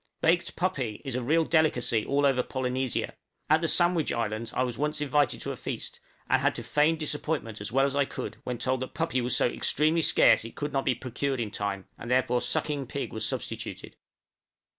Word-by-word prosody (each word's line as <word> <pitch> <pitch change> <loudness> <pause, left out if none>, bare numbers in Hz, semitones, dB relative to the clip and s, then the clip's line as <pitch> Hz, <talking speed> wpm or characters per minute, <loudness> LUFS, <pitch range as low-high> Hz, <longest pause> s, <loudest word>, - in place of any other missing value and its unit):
Baked 170 +2 +2
puppy 135 - -1
is 135 - -3
a 125 - -1
real 160 +6 +2
delicacy 140 -9 +2
all 140 +1 +1
over 135 -2 +3
Polynesia: 130 -1 -2 0.4
at 155 +1 +5
the 165 - +1
Sandwich 175 -1 +3
Islands 115 0 -2
I 130 - 0
was 125 -2 -2
once 150 +3 -1
invited 145 -1 +1
to - - -3
a - - -4
feast, - - -6 0.3
and - - +3
had - - +2
to - - -4
feign 150 +2 +3
disappointment 150 -7 -3
as 100 - -4
well 135 +2 +3
as 140 0 -1
I 140 -1 +3
could - - -6
when 125 -1 -3
told 130 +2 0
that 130 - -6
puppy 150 -6 0
was 120 0 0
so - - +3
extremely 155 +6 +1
scarce 150 - +5
it 115 - -9
could 145 0 -4
not 135 -1 0
be 130 - +2
procured 130 +2 -3
in 110 -3 -2
time, 100 -2 -3
and 115 - -7
therefore 125 -1 +2
sucking 145 -4 -1
pig 140 -1 -4
was 110 0 -2
substituted! - - -5
130 Hz, 205 wpm, -28 LUFS, 120-150 Hz, 0.4 s, at